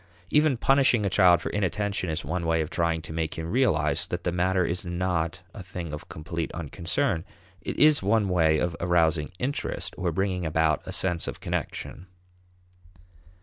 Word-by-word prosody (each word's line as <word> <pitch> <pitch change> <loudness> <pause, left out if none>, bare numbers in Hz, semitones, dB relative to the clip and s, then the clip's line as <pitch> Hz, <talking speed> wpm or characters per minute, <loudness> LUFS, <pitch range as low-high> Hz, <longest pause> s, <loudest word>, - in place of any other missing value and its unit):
Even 150 -3 +4
punishing 130 -4 +3
a 100 - 0
child 90 -2 +5
for - - -3
inattention 100 -1 -1
is 80 -1 -3
one 85 +4 -2
way 80 0 +2
of 80 - -4
trying 85 -1 0
to 80 - -8
make 80 -1 -2
him 80 +1 -5
realize 120 - +1
that 90 0 -4
the 90 - 0
matter 90 +1 +1
is 85 +3 -2
not 85 -2 -2
a - - -8
thing 90 -3 -7
of 75 - -8
complete 80 +1 -4
unconcern; 80 +1 -1 0.4
it - - -5
is 150 -1 +5
one 105 +1 +2
way 80 -4 +3
of 85 +2 -1
arousing 85 -3 +2
"interest," 130 +8 -2
or 90 -2 0
bringing 95 +1 -1
about 80 -2 +1
a - - -4
sense 90 -3 -1
of - - -5
connection. 90 - -4
85 Hz, 175 wpm, -26 LUFS, 80-95 Hz, 0.4 s, child